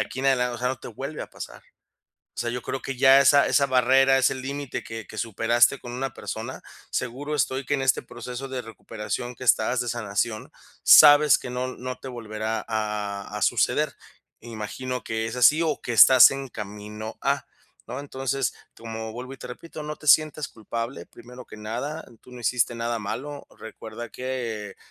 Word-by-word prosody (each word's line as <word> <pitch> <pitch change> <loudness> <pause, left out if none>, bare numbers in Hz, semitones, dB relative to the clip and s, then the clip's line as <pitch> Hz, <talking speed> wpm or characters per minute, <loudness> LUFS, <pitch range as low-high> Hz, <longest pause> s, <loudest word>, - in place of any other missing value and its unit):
aquí - - -4
en 135 - 0
adelan 125 -2 +2
o 120 - -6
sea, 125 - -1
no 130 - -3
te - - -8
vuelve 135 +6 -6
a - - -10
pasar. - - -9 0.7
O - - -3
sea, 120 - -1
yo 125 0 -4
creo 135 - -4
que 135 - -5
ya 135 +1 +7
esa 140 +1 +5
esa 140 - +3
barrera, 135 +1 +4
ese 130 0 +2
límite 140 +1 -5
que 115 -1 -7
que 110 - -9
superaste 115 +4 +2
con 120 - -9
una 135 +2 -4
persona, - - -6 0.3
seguro 135 +5 -3
estoy 135 -1 0
que 145 +3 -1
en 135 - 0
este 130 0 +2
proceso 125 +2 -7
de 130 -2 -4
recuperación 115 +2 -6
que 130 - -13
estás, 125 0 +3
de 120 - -2
sanación, 110 -1 -2 0.3
sabes 145 0 +8
que 125 - -7
no 125 +1 -3
no 130 0 -5
te - - -11
volverá 110 -2 -4
a 105 -2 -3
a - - -4
suceder, - - +2 0.5
imagino 120 +3 -5
que 110 0 -2
es 115 - -5
así, 150 +6 +5
o 155 -3 -1
que 120 - -3
estás 130 +3 +9
en 135 0 -4
camino 105 0 -8
a, - - 0 0.4
¿no? 125 - -5
Entonces, 135 -2 -2 0.2
como 110 -1 -6
vuelvo 125 +3 -7
y 135 - -8
te - - -9
repito, 155 +5 -9
no 150 0 -5
te 155 - -14
sientas 155 +1 +4
culpable, 115 -3 -6
primero 125 +1 -13
que - - -12
nada, 120 +9 -5 0.2
tú - - -16
no 125 - -10
hiciste 120 +1 +1
nada 115 0 -2
malo. 140 +8 -6
Recuerda 110 +1 -9
que 115 -6 -5
125 Hz, 190 wpm, -25 LUFS, 115-135 Hz, 0.7 s, estás